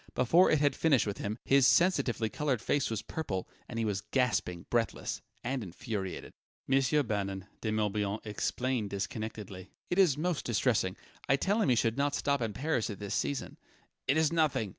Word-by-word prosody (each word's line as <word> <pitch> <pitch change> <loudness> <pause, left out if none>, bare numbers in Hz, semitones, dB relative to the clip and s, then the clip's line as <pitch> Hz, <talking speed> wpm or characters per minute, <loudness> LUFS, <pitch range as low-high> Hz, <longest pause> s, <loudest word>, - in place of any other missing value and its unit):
Before 165 +9 +5
it 155 - +4
had 145 -2 +2
finished 145 -6 +3
with 100 -2 -4
him, 105 +2 -3
his 135 -1 +5
sensitively 135 -10 +3
coloured 135 +2 -1
face 140 +4 0
was 110 -2 -3
purple, 100 - -4 0.2
and 115 - -5
he 115 - 0
was 105 -2 -1
gasping, 105 -6 0
breathless 115 -4 -1 0.2
and 130 +1 -2
infuriated. 95 0 -5 0.3
"Monsieur 135 +2 +3
Bannon," 100 -4 -3 0.2
De 110 - -1
Morbihan 105 -1 0
explained 115 +1 -1
disconnectedly 100 -1 -5 0.2
"it 175 - +1
is 170 -8 +5
most 170 0 -1
distressing 110 -4 +1 0.3
I 135 - +6
tell 200 +10 +1
him 145 - +2
he 125 - +5
should 115 +2 +1
not 145 0 +1
stop 140 -2 0
in 115 -2 -1
Paris 135 -1 -1
at 105 - -5
this 100 -1 -5
season 140 -2 -2 0.2
" - - -43
"It 135 - +3
is 160 0 +3
nothing!" 140 -10 +1
120 Hz, 185 wpm, -31 LUFS, 105-140 Hz, 0.3 s, I